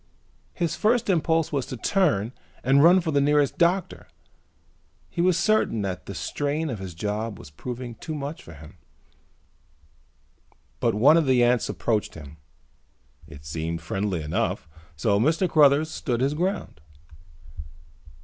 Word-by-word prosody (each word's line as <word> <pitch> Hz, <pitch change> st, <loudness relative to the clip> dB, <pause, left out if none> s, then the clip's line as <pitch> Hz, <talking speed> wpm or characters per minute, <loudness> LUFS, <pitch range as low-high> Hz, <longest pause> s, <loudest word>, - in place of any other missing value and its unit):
His 170 Hz, -3 st, -1 dB
first 225 Hz, -1 st, +2 dB
impulse 165 Hz, -2 st, +1 dB
was 140 Hz, -4 st, -2 dB
to 130 Hz, -, -6 dB
turn 125 Hz, -, +1 dB, 0.3 s
and 135 Hz, +3 st, +4 dB
run 180 Hz, +3 st, +6 dB
for 165 Hz, -2 st, -2 dB
the 140 Hz, -1 st, +2 dB
nearest 145 Hz, 0 st, +2 dB
doctor. 180 Hz, +2 st, 0 dB, 1.0 s
He 170 Hz, -, -2 dB
was 180 Hz, -1 st, +3 dB
certain 215 Hz, -, +1 dB
that 95 Hz, -2 st, -5 dB
the 100 Hz, -, -6 dB
strain 145 Hz, -, -2 dB
of 110 Hz, -, -5 dB
his 95 Hz, -3 st, -7 dB
job 105 Hz, +3 st, -3 dB
was 70 Hz, -, -13 dB
proving 120 Hz, -, -7 dB
too 155 Hz, +7 st, -7 dB
much 145 Hz, +2 st, -5 dB
for 80 Hz, -, -13 dB
him. 75 Hz, +1 st, -14 dB, 2.0 s
But -, -, +1 dB
one 140 Hz, +9 st, +6 dB
of 160 Hz, -4 st, +1 dB
the 125 Hz, -2 st, +4 dB
ants 120 Hz, -1 st, +2 dB
approached 110 Hz, -3 st, -1 dB
him. 80 Hz, -1 st, -11 dB, 0.9 s
It 75 Hz, -3 st, -13 dB
seemed 80 Hz, +1 st, -4 dB
friendly 95 Hz, -1 st, -2 dB
enough, 75 Hz, +1 st, -2 dB, 0.3 s
so 100 Hz, +7 st, +1 dB
Mr. 160 Hz, -, +2 dB
Cruthers 150 Hz, -1 st, +4 dB
stood 120 Hz, -4 st, -2 dB
his 135 Hz, +3 st, +1 dB
ground. 180 Hz, -, -3 dB
130 Hz, 145 wpm, -25 LUFS, 100-160 Hz, 2.0 s, run